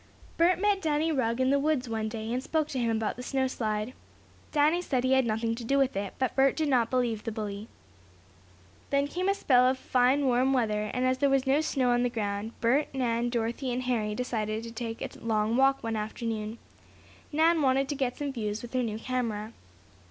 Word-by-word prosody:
Bert 350 Hz, +2 st, +3 dB
met 405 Hz, -1 st, +2 dB
Danny 315 Hz, 0 st, +1 dB
Rugg 245 Hz, -5 st, 0 dB
in 260 Hz, +1 st, +3 dB
the 280 Hz, -, +3 dB
woods 285 Hz, -3 st, 0 dB
one 220 Hz, -1 st, -2 dB
day, 220 Hz, +1 st, -4 dB
and 250 Hz, -, -1 dB
spoke 310 Hz, +2 st, 0 dB
to 260 Hz, -, -3 dB
him 235 Hz, -1 st, +1 dB
about 220 Hz, 0 st, -2 dB
the -, -, -6 dB
snow 265 Hz, +1 st, 0 dB
slide. 220 Hz, -2 st, -2 dB, 0.6 s
Danny 305 Hz, +4 st, +3 dB
said 260 Hz, -8 st, -1 dB
he 260 Hz, -, +1 dB
had 265 Hz, -, +5 dB
had 265 Hz, -, +3 dB
nothing 225 Hz, +1 st, 0 dB
to 235 Hz, +1 st, -6 dB
do 275 Hz, +5 st, +1 dB
with 270 Hz, -4 st, +2 dB
it, 195 Hz, -1 st, -3 dB
but 260 Hz, -1 st, -1 dB
Bert 270 Hz, 0 st, +4 dB
did 310 Hz, -2 st, 0 dB
not 240 Hz, -4 st, +3 dB
believe 240 Hz, -4 st, 0 dB
the 225 Hz, -, -3 dB
bully. 210 Hz, -1 st, -5 dB, 1.2 s
Then 280 Hz, 0 st, +2 dB
came 365 Hz, +5 st, -1 dB
a 395 Hz, -, +2 dB
spell 255 Hz, -8 st, +4 dB
of 260 Hz, +1 st, +1 dB
fine, 260 Hz, +2 st, +2 dB
warm 255 Hz, +1 st, +3 dB
weather, 215 Hz, -4 st, 0 dB
and 250 Hz, 0 st, -1 dB
as 255 Hz, 0 st, +1 dB
there 280 Hz, -, +3 dB
was 270 Hz, 0 st, +2 dB
no 275 Hz, +3 st, +3 dB
snow 265 Hz, -5 st, +1 dB
on 240 Hz, 0 st, +2 dB
the 245 Hz, -, +1 dB
ground, 210 Hz, -1 st, -3 dB
Bert, 260 Hz, +6 st, +3 dB
Nan, 240 Hz, -2 st, 0 dB
Dorothy 235 Hz, +2 st, -2 dB
and 250 Hz, +1 st, -2 dB
Harry 220 Hz, -4 st, -1 dB
decided 220 Hz, -3 st, -2 dB
to 230 Hz, -, -7 dB
take 230 Hz, 0 st, -5 dB
a -, -, -7 dB
long 220 Hz, 0 st, 0 dB
walk 270 Hz, +1 st, +3 dB
one 225 Hz, -1 st, -2 dB
afternoon. 220 Hz, 0 st, -4 dB, 0.7 s
Nan 320 Hz, +2 st, +3 dB
wanted 270 Hz, 0 st, +2 dB
to 290 Hz, -, -1 dB
get 260 Hz, -3 st, -2 dB
some 285 Hz, -2 st, -3 dB
views 215 Hz, -3 st, -3 dB
with 240 Hz, -, -9 dB
her 255 Hz, -, +1 dB
new 220 Hz, -3 st, -2 dB
camera. 225 Hz, -3 st, -3 dB
250 Hz, 220 wpm, -28 LUFS, 225-270 Hz, 1.2 s, had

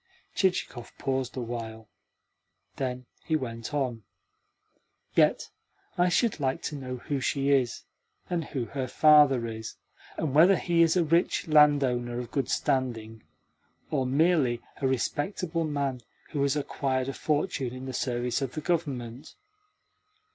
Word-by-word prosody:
Chichikov 180 Hz, -, -1 dB
paused 130 Hz, -1 st, -2 dB
awhile. 115 Hz, -2 st, -5 dB, 0.9 s
Then 125 Hz, -1 st, -3 dB, 0.2 s
he 160 Hz, -, 0 dB
went 115 Hz, -6 st, -4 dB
on: 130 Hz, -6 st, -2 dB, 1.1 s
"Yet -, -, +2 dB, 0.4 s
I 180 Hz, 0 st, +3 dB
should 225 Hz, +1 st, +1 dB
like 135 Hz, -2 st, -1 dB
to 150 Hz, -, -3 dB
know 130 Hz, -2 st, -5 dB
who 140 Hz, +3 st, -3 dB
she 140 Hz, +1 st, 0 dB
is, 130 Hz, -4 st, +1 dB, 0.4 s
and 170 Hz, -2 st, -2 dB
who 130 Hz, -6 st, -3 dB
her 130 Hz, +3 st, -4 dB
father 145 Hz, -4 st, +5 dB
is, 110 Hz, -1 st, -6 dB, 0.4 s
and 150 Hz, -5 st, -2 dB
whether 175 Hz, +6 st, +7 dB
he 170 Hz, -2 st, +1 dB
is 165 Hz, +2 st, +4 dB
a 175 Hz, -, +4 dB
rich 165 Hz, +2 st, +1 dB
landowner 140 Hz, -6 st, +3 dB
of 125 Hz, -1 st, -5 dB
good 140 Hz, -, -1 dB
standing, 115 Hz, -4 st, -1 dB, 0.7 s
or 135 Hz, -4 st, 0 dB
merely 140 Hz, -3 st, +2 dB, 0.2 s
a 135 Hz, -, +2 dB
respectable 160 Hz, -, -1 dB
man 140 Hz, -4 st, -2 dB, 0.3 s
who 145 Hz, -, -1 dB
has 140 Hz, 0 st, +2 dB
acquired 135 Hz, -2 st, -1 dB
a 135 Hz, -, -3 dB
fortune 145 Hz, -4 st, -1 dB
in 130 Hz, +1 st, -8 dB
the 130 Hz, -, -5 dB
service 120 Hz, -1 st, -1 dB
of 130 Hz, -2 st, -3 dB
the 155 Hz, -, -4 dB
Government. 140 Hz, -5 st, -3 dB
135 Hz, 140 wpm, -28 LUFS, 125-155 Hz, 1.1 s, whether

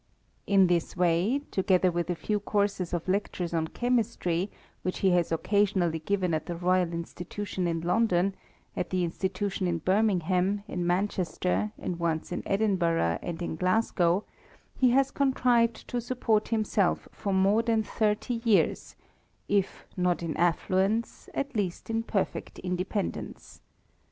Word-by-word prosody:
In 195 Hz, -1 st, +5 dB
this 175 Hz, -1 st, 0 dB
way, 180 Hz, +10 st, +2 dB
together 185 Hz, -1 st, +3 dB
with 175 Hz, 0 st, -2 dB
a 175 Hz, -, 0 dB
few 210 Hz, +6 st, -1 dB
courses 200 Hz, -3 st, 0 dB
of 175 Hz, -1 st, -3 dB
lectures 185 Hz, -3 st, -1 dB
on 160 Hz, -1 st, 0 dB
chemistry, 215 Hz, -5 st, 0 dB, 0.3 s
which 185 Hz, -, -3 dB
he 190 Hz, -, +5 dB
has 175 Hz, -2 st, +2 dB
occasionally 185 Hz, -1 st, +1 dB
given 185 Hz, +1 st, 0 dB
at 155 Hz, 0 st, -2 dB
the 175 Hz, -, -3 dB
Royal 180 Hz, 0 st, +1 dB
Institution 175 Hz, +3 st, -4 dB
in 165 Hz, -1 st, -1 dB
London, 185 Hz, +1 st, +2 dB, 0.4 s
at -, -, -2 dB
the 185 Hz, -1 st, 0 dB
Institution 190 Hz, +2 st, -2 dB
in 170 Hz, -1 st, 0 dB
Birmingham, 185 Hz, +1 st, +1 dB
in 175 Hz, -3 st, -2 dB
Manchester, 185 Hz, +2 st, 0 dB
and 175 Hz, -1 st, -4 dB
once 165 Hz, -1 st, -1 dB
in -, -, -2 dB
Edin 200 Hz, -1 st, +1 dB
bui^'h 165 Hz, -, +1 dB
and 175 Hz, 0 st, -5 dB
in 165 Hz, -, -3 dB
Glasgow, 185 Hz, 0 st, +2 dB, 0.5 s
he 255 Hz, -, +4 dB
has 270 Hz, +2 st, +3 dB
contrived 245 Hz, -4 st, +2 dB
to 245 Hz, -, -1 dB
support 230 Hz, -3 st, 0 dB
himself 215 Hz, -4 st, +1 dB
for 200 Hz, -, -4 dB
more 195 Hz, +3 st, +4 dB
than 230 Hz, -1 st, +1 dB
thirty 215 Hz, +2 st, -1 dB
years, 225 Hz, -4 st, +2 dB, 0.5 s
if 200 Hz, -2 st, 0 dB
not 180 Hz, -1 st, +1 dB
in 165 Hz, -2 st, -3 dB
affluence, 190 Hz, +6 st, 0 dB
at 280 Hz, -1 st, -2 dB
least 200 Hz, +1 st, -2 dB
in 225 Hz, 0 st, +1 dB
perfect 210 Hz, -4 st, -2 dB
independence. 185 Hz, +3 st, -4 dB
190 Hz, 145 wpm, -28 LUFS, 175-210 Hz, 0.5 s, In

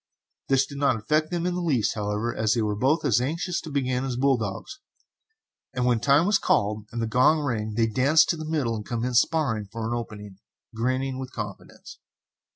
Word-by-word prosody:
This 135 Hz, 0 st, +3 dB
did 140 Hz, -1 st, -9 dB
not 140 Hz, -3 st, +3 dB
affect 155 Hz, +8 st, 0 dB
them 175 Hz, -1 st, -2 dB
in 180 Hz, -, 0 dB
the 180 Hz, -, -2 dB
least, 140 Hz, -10 st, +1 dB
however, 105 Hz, +2 st, -2 dB
as 110 Hz, +1 st, +1 dB
they 115 Hz, -, +1 dB
were 105 Hz, -1 st, -1 dB
both 145 Hz, +9 st, +1 dB
as 120 Hz, -4 st, +3 dB
anxious 170 Hz, +6 st, -2 dB
to 160 Hz, -, -8 dB
begin 130 Hz, -3 st, -1 dB
as 130 Hz, -2 st, -3 dB
bull 135 Hz, +2 st, +3 dB
dogs, 110 Hz, -, -5 dB, 1.0 s
and 125 Hz, -1 st, 0 dB
when 120 Hz, -2 st, +2 dB
time 140 Hz, +7 st, +4 dB
was 200 Hz, 0 st, +3 dB
called 105 Hz, +1 st, 0 dB
and 120 Hz, -, -4 dB
the 115 Hz, -, 0 dB
gong 125 Hz, +7 st, +3 dB
rang, 110 Hz, -7 st, -2 dB
they 115 Hz, 0 st, +3 dB
danced 135 Hz, +8 st, +4 dB
to -, -, +2 dB
the 155 Hz, -1 st, -6 dB
middle 135 Hz, -8 st, 0 dB
and 105 Hz, -, -5 dB
commenced 120 Hz, +2 st, +2 dB
sparring 120 Hz, -11 st, -1 dB
for 115 Hz, -1 st, -4 dB
an 120 Hz, -, -2 dB
opening, 105 Hz, -4 st, -7 dB, 0.3 s
grinning 130 Hz, +3 st, -1 dB
with 130 Hz, 0 st, -6 dB
confidence. 105 Hz, -2 st, -8 dB
125 Hz, 205 wpm, -25 LUFS, 110-145 Hz, 1.0 s, time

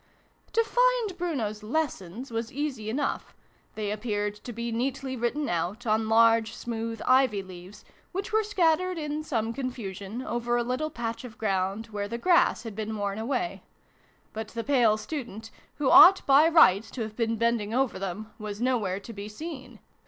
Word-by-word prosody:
To 460 Hz, -, +4 dB
find -, -, +2 dB
Bruno's 265 Hz, -, -3 dB
lessons 240 Hz, -, -3 dB
was 225 Hz, 0 st, -3 dB
easy 260 Hz, -6 st, -3 dB
enough: 280 Hz, +6 st, -2 dB, 0.4 s
they 210 Hz, -1 st, -2 dB
appeared 210 Hz, -1 st, -2 dB
to 240 Hz, -, -9 dB
be 235 Hz, +1 st, -4 dB
neatly 260 Hz, +3 st, -2 dB
written 255 Hz, +5 st, -1 dB
out 175 Hz, +8 st, -2 dB
on 220 Hz, 0 st, +1 dB
large 230 Hz, 0 st, +4 dB
smooth 230 Hz, -1 st, -4 dB
ivy 255 Hz, -6 st, +3 dB
leaves, 185 Hz, +1 st, -12 dB, 0.3 s
which 390 Hz, +4 st, -4 dB
were 440 Hz, -, +4 dB
scattered 365 Hz, -3 st, +1 dB
in 300 Hz, -1 st, -3 dB
some 230 Hz, -7 st, -1 dB
confusion 230 Hz, -4 st, -5 dB
over 240 Hz, -1 st, -1 dB
a 240 Hz, -, +1 dB
little 255 Hz, +6 st, -2 dB
patch 230 Hz, -4 st, -4 dB
of 235 Hz, -3 st, -10 dB
ground 195 Hz, +1 st, -1 dB
where 205 Hz, -1 st, -3 dB
the 235 Hz, -, -4 dB
grass 345 Hz, +1 st, +3 dB
had 225 Hz, -3 st, -6 dB
been 220 Hz, 0 st, -4 dB
worn 200 Hz, 0 st, -2 dB
away; 280 Hz, +10 st, -2 dB, 0.7 s
but 220 Hz, 0 st, -5 dB
the 230 Hz, +1 st, -5 dB
pale 240 Hz, -6 st, +3 dB
student, 225 Hz, -4 st, -6 dB, 0.2 s
who 285 Hz, -3 st, +1 dB
ought 375 Hz, +2 st, +9 dB
by 280 Hz, +3 st, +6 dB
rights 225 Hz, -, +5 dB
to 250 Hz, -, -6 dB
have 215 Hz, -1 st, -7 dB
been 230 Hz, -1 st, 0 dB
bending 230 Hz, -2 st, 0 dB
over 255 Hz, -2 st, 0 dB
them, 195 Hz, +3 st, -5 dB
was 210 Hz, -1 st, -6 dB
nowhere 225 Hz, -7 st, 0 dB
to 230 Hz, +3 st, -10 dB
be 205 Hz, 0 st, -7 dB
seen: -, -, -13 dB
SYLVIE 330 Hz, +2 st, -5 dB
AND 265 Hz, -2 st, -10 dB
BRUNO -, -, -16 dB
CONCLUDED. -, -, -34 dB
230 Hz, 180 wpm, -27 LUFS, 215-275 Hz, 0.7 s, ought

